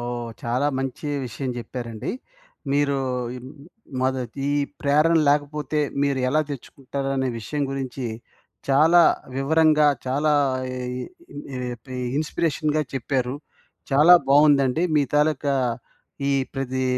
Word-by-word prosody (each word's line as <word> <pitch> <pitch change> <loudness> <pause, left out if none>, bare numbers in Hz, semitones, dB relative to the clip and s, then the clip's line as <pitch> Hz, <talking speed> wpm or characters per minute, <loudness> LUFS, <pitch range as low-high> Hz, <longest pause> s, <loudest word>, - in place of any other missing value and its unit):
ఓహ్! 120 -1 -4
చాలా 125 +4 0
మంచి 135 +3 -4 0.2
విషయం 130 +2 -4
చెప్పారండి. 120 -2 -5 0.6
మీరూ 140 0 +2 0.4
ఈ - - -7 0.6
మొద 130 +1 +1 0.3
ఈ - - +1 0.3
ప్రేరణ 150 +4 +3
లేకపోతే 145 0 0 0.2
మీరు 140 -1 +1
ఎలా 155 +4 +2
తెచ్చుకుంటారనే 135 0 -3
విషయం 145 +6 -3
గురించి 135 -2 -4 0.6
చాలా 160 +5 +6 0.3
వివరంగా 155 +2 +4 0.2
చాలా 145 +4 +1 0.4
ఇ 125 0 -4 0.7
ఏటి 125 +1 -7 0.2
ఇన్స్‌పిరేషన్‌గా 155 -1 0
చెప్పారు. 130 -1 -1 0.6
చాలా 150 +6 +7
బావుందండి. 140 +1 +4
మీ 145 - +4
తాలూకా 150 -1 +2 0.8
ఈ - - +2 0.2
ప్రది 130 -1 -2
140 Hz, 105 wpm, -23 LUFS, 130-150 Hz, 0.8 s, చాలా